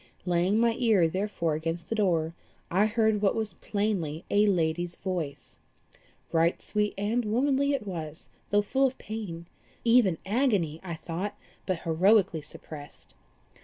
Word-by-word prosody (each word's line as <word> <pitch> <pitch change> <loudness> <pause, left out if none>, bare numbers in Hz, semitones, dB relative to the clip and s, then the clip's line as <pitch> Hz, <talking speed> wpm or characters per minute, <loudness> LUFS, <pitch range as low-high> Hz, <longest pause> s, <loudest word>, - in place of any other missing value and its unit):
Laying 180 +3 +2
my 235 0 +4
ear 215 -9 +4
therefore 185 -2 -1
against 165 +2 -3
the - - 0
door, 170 -7 +1 0.4
I 195 +5 +4
heard 220 -1 +2
what 200 - +3
was 220 -4 -2
plainly 185 -7 -2
a 205 +1 +4
lady's 175 -2 0
voice. 175 -7 -5 0.7
Right 165 +1 +2
sweet 210 -1 -1
and 215 +5 0
womanly 270 +6 +2
it 270 -6 -2
was, 160 -5 -6 0.2
though 205 0 +3
full 270 +6 +2
of 260 - -6
pain 200 -6 -6 0.4
even 230 -7 +4
agony, 195 - +1
I 170 -3 -4
thought, 185 +6 -4 0.3
but 185 -3 -1
heroically 175 0 +3
suppressed. 150 0 -11
195 Hz, 140 wpm, -28 LUFS, 165-215 Hz, 0.7 s, my